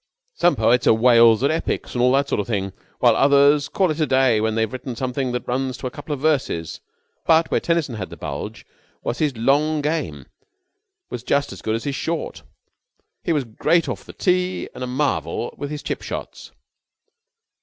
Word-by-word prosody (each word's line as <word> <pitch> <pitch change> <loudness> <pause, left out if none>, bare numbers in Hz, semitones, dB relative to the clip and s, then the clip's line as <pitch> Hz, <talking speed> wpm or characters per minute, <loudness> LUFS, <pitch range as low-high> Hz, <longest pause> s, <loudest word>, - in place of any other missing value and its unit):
"Some 175 - +3
poets 120 +3 +2
are - - +6
whales 115 0 +5
at 140 - +3
epics 160 - -2
and 120 - -1
all 125 +1 +4
that 140 +1 +2
sort - - 0
of - - -8
thing, 95 -4 -2 0.2
while 120 -3 +4
others 140 +1 +4
call 185 -4 +1
it 155 - -4
a 155 - +2
day 130 -5 +3
when 110 0 0
they've 110 0 0
written 130 -1 -5
something 130 +1 -2
that 125 0 -4
runs 130 +1 -2
to - - -8
a 125 - -2
couple 145 +3 -9
of 145 - -2
verses, 135 - -1 0.5
but 165 0 +4
where - - +3
Tennyson 165 -6 0
had 100 -4 -5
the - - -10
bulge - - -6 0.4
was 120 - -3
that 155 - +3
his 140 -5 -3
long 145 +6 +2
game 145 - -2 0.9
was 120 - -4
just 140 +3 0
as - - -11
good 110 - -1
as 115 - -4
his 140 - -2
short. 155 - -3 0.8
He - - -1
was 150 -4 +1
great 145 +9 +1
off - - -4
the - - -12
tee 180 0 0
and - - -6
a - - -3
marvel 125 - -1
with 145 - -5
his 150 0 -6
chip - - -3
shots." - - -7
130 Hz, 205 wpm, -22 LUFS, 115-150 Hz, 0.9 s, are